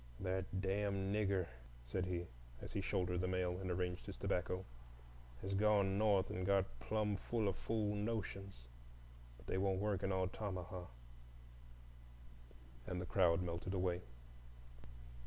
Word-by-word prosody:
"That 95 0 0 0.2
damn 100 0 +1
Nigger," 100 -3 +2 0.4
said 90 +9 -1
he, 90 -1 -1 0.3
as - - -8
he 100 - 0
shouldered 90 -2 +1
the 90 - +1
mail 90 -1 0
and 95 -1 -3
arranged 90 +1 -1
his 100 - -6
tobacco, 90 -1 0 0.8
"has 95 +1 -1
gone 100 -1 +4
North 100 -3 +4
and 90 - -2
got 95 0 +4
plum 105 - +1
full 110 +1 0
o' 100 - +2
fool 105 +1 0
notions; 100 - -2 0.8
but - - -16
they 95 - 0
won't 95 -1 +2
work 100 -2 +1
in 95 -1 +1
Altamaha." 95 -1 -2 2.0
And 90 - -2
the 90 - -2
crowd 90 -2 +4
melted 85 +2 -2
away. 90 -1 +1
95 Hz, 140 wpm, -39 LUFS, 90-100 Hz, 2.0 s, gone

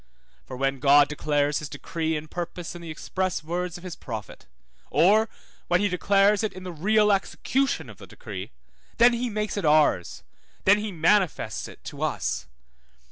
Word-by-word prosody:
for 130 - -7
when 135 0 0
God 145 +1 +6
declares 145 -1 0
his 150 - -7
decree 160 -1 -3
and 150 +1 -7
purpose 175 0 -5
in 175 - -9
the 170 - -8
express 185 +3 -3
words 175 +2 -3
of 175 - -14
his 180 -3 -6
prophet, 110 -5 -8 0.4
or 215 +5 +4 0.4
when 175 - +3
he 205 +1 +1
declares 200 +3 +3
it 215 - -1
in 185 - -9
the 180 - -5
real 210 +6 +3
execution 265 +7 0
of - - -12
the - - -11
decree, - - -8 0.5
then 240 +1 +6
he 240 +1 -1
makes 210 -1 -3
it 200 - -2
ours, 150 - +2 0.4
then 205 +2 +6
he 210 0 -4
manifests 170 - +1
it - - -14
to - - -8
us. - - -2
180 Hz, 175 wpm, -25 LUFS, 150-205 Hz, 0.5 s, God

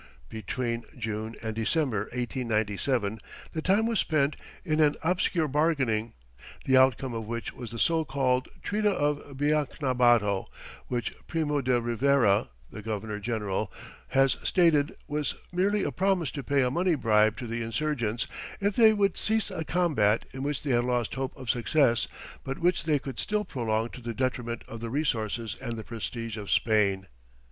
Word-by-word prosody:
Between 115 +2 -3
June 110 -1 -4
and 110 -1 -2
December, 115 -1 0
1897, 115 -2 -1 0.3
the 160 - -2
time 200 +6 +3
was 230 -2 +1
spent 150 -2 +1 0.3
in 155 -2 +1
an 150 -1 +4
obscure 175 -1 +1
bargaining, 135 -7 +1 0.5
the 130 - +4
outcome 130 -1 +4
of 110 -2 -4
which 115 -1 -4
was 120 - -7
the 115 - -7
so 165 +6 +3
called 130 -3 0 0.2
Treaty 210 +1 0
of 145 -7 -1
Biacnabato, 125 -8 +2 0.4
which 120 -2 -2
Primo 150 -3 0
de 125 -1 +2
Rivera 120 - +2 0.2
the 110 - -7
governor 105 0 -4
general 105 -2 -2 0.4
has 135 -1 +3
stated 160 -5 +3
was 150 0 -1 0.2
merely 195 +3 +1
a - - -1
promise 185 -6 +1
to 140 - -5
pay 140 0 +2
a 125 - +1
money 175 +2 +2
bribe 110 -4 +3
to 125 - -5
the 115 0 -3
insurgents 115 -1 -1 0.3
if 200 -1 0
they 220 -2 +7
would 200 -3 +1
cease 220 0 +1
a 160 - -3
combat 150 -12 +2
in 135 - -6
which 145 0 -2
they 145 - -1
had 120 -1 +3
lost 120 -2 0
hope 135 0 -4
of 130 - -9
success 120 +1 +2 0.4
but 135 0 -4
which 175 0 +1
they 155 -2 +3
could 135 -3 -6
still 210 0 0
prolong 115 -7 -1
to 125 - -10
the 115 -1 -5
detriment 125 -2 -2
of 115 - -7
the 115 0 -5
resources 115 -6 -1
and 120 -3 -4
the 110 - -5
prestige 115 0 -5
of 105 -2 -6
Spain. 100 -4 +2
130 Hz, 165 wpm, -28 LUFS, 115-150 Hz, 0.5 s, they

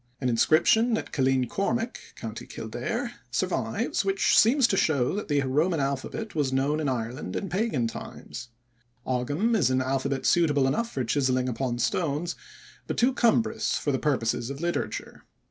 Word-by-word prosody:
An 130 - 0
inscription 220 - +4
at - - -6
Killeen 130 -2 +2
Cormac, 225 - -1 0.2
Co. - - -6
Kildare, - - -4 0.2
survives - - -1
which 390 +1 +2
seems 255 +4 +5
to 205 - +1
show 140 -9 +2
that 205 - -3
the 145 -2 +2
Roman 155 +6 +1
alphabet 140 - -3
was 145 -4 0
known 140 +3 +1
in 150 -3 0
Ireland 120 +1 -4
in 195 - -3
pagan 185 - 0
times. 115 +1 -7 0.6
Ogam 145 - 0
is 165 - +3
an 130 0 +2
alphabet 135 +1 -1
suitable 150 -5 +3
enough 230 - 0
for 130 - -2
chiselling 130 +1 +1
upon 125 0 -2
stones, 160 +5 -1 0.5
but - - -3
too 250 +2 +3
cumbrous 230 -2 +2
for 145 - -1
the 130 - 0
purposes 120 -5 0
of 140 0 -6
literature. 170 +1 -3
145 Hz, 160 wpm, -27 LUFS, 130-195 Hz, 0.6 s, seems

